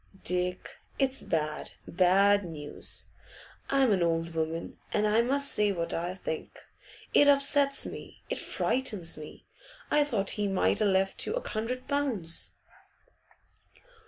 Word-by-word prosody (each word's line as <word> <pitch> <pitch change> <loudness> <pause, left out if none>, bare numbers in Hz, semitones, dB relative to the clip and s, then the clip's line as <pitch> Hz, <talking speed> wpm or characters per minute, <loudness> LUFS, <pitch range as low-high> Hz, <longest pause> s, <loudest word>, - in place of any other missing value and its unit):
'Dick, 180 0 -2 0.2
it's 270 -1 +1
bad, 155 -2 -2
bad 195 +3 +4
news! 155 -4 -4 0.6
I'm 270 -4 +3
an 190 -3 +2
old 165 0 0
woman, 160 +1 -3
and 210 - +1
I 215 +2 +4
must 280 +3 +3
say 210 -1 +2
what 170 -3 -3
I 175 +2 -2
think. 160 -4 -5 0.6
It 290 - +6
upsets 280 0 +3
me; - - -9
it - - -3
frightens 210 -10 0
me. 150 0 -11 0.5
I 295 - +5
thought 215 -9 0
he 205 - +1
might 195 +2 +1
a' - - +4
left 195 -1 +1
you - - -1
a - - -4
hundred 240 +4 -3
pounds. 245 - 0
200 Hz, 135 wpm, -29 LUFS, 170-260 Hz, 0.6 s, It